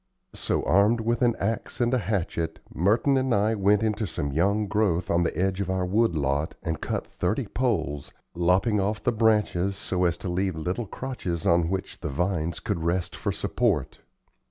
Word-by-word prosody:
So, - - -1
armed 105 +5 +3
with 120 +3 0
an 120 -2 +3
axe 110 +3 -3
and 120 0 +2
a 130 - +3
hatchet, 85 -6 -2 0.2
Merton 110 - +2
and 130 -2 +1
I 105 +2 +2
went 105 0 +3
into 110 -1 0
some 70 -4 -3
young 100 +8 +2
growth 100 -4 0
on 85 - +3
the 85 - -1
edge 95 +1 0
of 95 - -3
our 95 -1 0
wood 105 0 +2
lot 70 +1 -1
and 80 -1 -3
cut - - -2
thirty - - -2
poles, 70 0 -1 0.2
lopping 90 +5 +2
off 105 +2 -2
the 120 - +2
branches 105 -4 +2
so 90 -1 -1
as 85 -1 +1
to - - -6
leave 90 0 -1
little 90 +8 -3
crotches 95 -10 -4
on 85 -1 +3
which 95 0 -4
the - - -4
vines 85 +2 -1
could 95 -6 -3
rest 85 +1 -1
for - - -2
support. - - -1
95 Hz, 185 wpm, -26 LUFS, 85-110 Hz, 0.2 s, armed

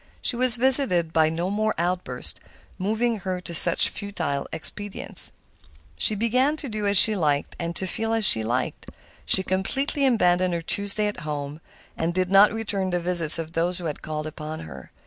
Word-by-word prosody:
She - - -1
was 250 0 +6
visited 240 - +7
by 160 -1 +2
no 170 +4 -4
more 215 +1 -2
outbursts, 175 +2 -4 0.4
moving 220 +4 -2
her 185 -1 -5
to 170 - -7
such 170 +1 +4
futile 200 -9 -5
expedients. 205 +5 -5 0.6
She 215 - +4
began 255 +8 -1
to 290 - -5
do 215 -3 -5
as 200 0 +1
she 215 +1 +7
liked 150 -6 -2
and 170 0 -5
to 190 - 0
feel 225 +4 -3
as 225 -1 0
she 110 -11 +5
liked. 125 +3 -4 0.4
She 190 - +5
completely 270 +10 -2
abandoned 180 -6 0
her 170 - -6
Tuesdays 205 +4 -1
at 205 - -9
home, 150 0 -7 0.3
and 170 +1 -4
did 185 0 -2
not 195 +2 +5
return 205 -4 -4
the 175 -1 -2
visits 170 -3 +4
of 165 -1 -7
those 175 +2 -1
who 180 - -4
had 150 -3 -6
called 155 0 -6
upon 155 0 -8
her. 70 -4 -12
185 Hz, 185 wpm, -22 LUFS, 165-215 Hz, 0.6 s, visited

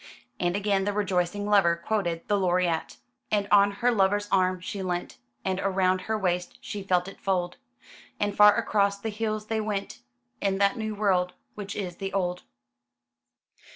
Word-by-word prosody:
And 175 0 0
again 200 -1 +1
the 205 - 0
rejoicing 195 -1 0
lover 195 -5 +4
quoted 170 -2 -2
the 205 - +2
Laureate: 180 -3 0 0.3
"And 205 -1 +1
on 200 -1 +6
her 235 +5 +1
lover's 205 -1 +2
arm 185 -1 +2
she 195 +2 -5
leant, 180 -6 -3 0.3
And 190 0 -1
round 185 -1 +2
her 220 +3 -2
waist 180 -3 -1
she 205 - -6
felt 185 -2 +1
it 195 - -10
fold; 180 -2 -1 0.6
And 205 -1 -1
far 210 0 +7
across 200 -1 +1
the 220 +3 -4
hills 215 0 -3
they 220 0 -1
went, 200 - -4 0.4
In 195 -1 +1
that 200 +3 +3
new 220 -2 -3
world 185 -3 +1 0.2
which 200 -1 -6
is 180 -4 -4
the 195 -1 -5
old." 180 -2 -1
195 Hz, 165 wpm, -27 LUFS, 180-205 Hz, 0.6 s, far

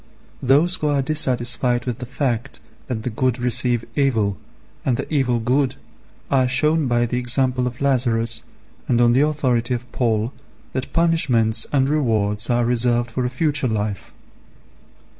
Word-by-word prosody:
Those 150 +8 +3
who 150 - -2
are 140 -2 +1
dissatisfied 125 -4 +2
with 120 -3 -4
the 125 - -6
fact 125 -3 -3 0.3
that 115 -4 -4
the 125 - -3
good 125 +2 0
receive 120 -1 0
evil, 110 -8 +1 0.5
and 125 -3 0
the - - -3
evil 125 -5 +1
good, 130 +4 0 0.6
are 130 -2 +3
shown 150 +4 +1
by 120 -1 +1
the 125 +1 -2
example 125 +1 0
of 125 +1 -7
Lazarus, 120 -4 +1 0.5
and 120 - +2
on 120 0 +4
the 130 - +3
authority 130 -5 0
of 120 0 -7
Paul, 115 0 -1 0.4
that 130 0 -4
punishments 150 -10 +2
and 135 -2 +2
rewards 110 -8 0
are 120 -1 +2
reserved 120 0 +1
for 125 +2 -2
a - - 0
future 145 +1 0
life. 105 -3 -3
125 Hz, 155 wpm, -21 LUFS, 120-135 Hz, 0.6 s, on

